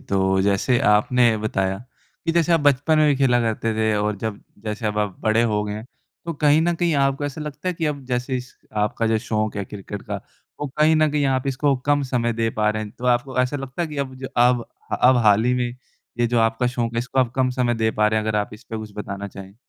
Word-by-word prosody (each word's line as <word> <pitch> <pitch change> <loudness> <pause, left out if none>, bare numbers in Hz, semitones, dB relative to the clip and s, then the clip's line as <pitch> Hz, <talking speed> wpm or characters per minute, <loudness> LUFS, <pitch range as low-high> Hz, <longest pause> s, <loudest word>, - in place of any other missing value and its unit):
तो 95 -1 +1
जैसे 100 +5 +2
आपने 110 +2 +4
बताया 95 -3 -1 0.5
कि 165 - +1
जैसे 170 0 +2
आप 165 - +4
बचपन 145 +2 +3
में 155 - +5
भी 145 - +4
खेला 130 -3 +3
करते 115 -1 -1
थे 110 0 +1
और 105 0 0
जब 110 -1 -4 0.2
जैसे 110 +1 -3
अब 105 0 -1
आप 105 -3 -1
बड़े 110 +2 +2
हो 105 -3 +1
गए 105 - -4
हैं 110 - -7 0.4
तो 170 - -3
कहीं 150 +1 +4
न 170 0 +1
कहीं 170 -1 +1
आपको 135 +1 0
ऐसा 145 +2 -4
लगता 150 +4 -5
है 180 - -1
कि 165 -1 -2
अब 140 -3 -3
जैसे 125 +1 -1
इस 125 +1 -8 0.3
आपका 115 +2 -1
जो 110 0 +2
शौक़ 110 -2 -2
है 100 - -2
क्रिकेट 100 0 -8
का - - -4 0.4
वो 145 - -1
कहीं 155 +1 +4
न 155 -1 +3
कहीं 145 -1 +1
आप 130 0 0
इसको 135 +1 +1
कम 145 0 +3
समय 125 -3 0
दे 115 0 0
पा 105 - +3
रहे 110 0 -3
हैं? 105 - -7
तो 125 - -10
आपको 125 +2 +1
ऐसा 125 +3 0
लगता 135 +4 -4
है 165 - -2
कि 150 - -8
अब 130 - -11
ज 135 - -4
अब 120 0 +4 0.4
अब 130 0 +6
हाल 105 +1 +5
ही 125 +1 +2
में 125 -1 0 0.5
ये 120 - +3
जो 120 0 +1
आपका 115 +2 +1
शौक़ 120 -2 -2
है 115 - 0
इसको 125 +2 -3
अब 125 -2 +1
कम 130 -1 +2
समय 125 -1 0
दे 110 0 +1
पा 105 -1 +2
रहें 110 0 +1
हैं? 110 - -3
अगर 105 -1 +1
आप 105 - -2
इस 110 - -15
पे 110 - -6
कुछ 110 -1 -7
बताना 100 -1 -5
चाहें। 95 0 -11
120 Hz, 260 wpm, -22 LUFS, 110-135 Hz, 0.5 s, अब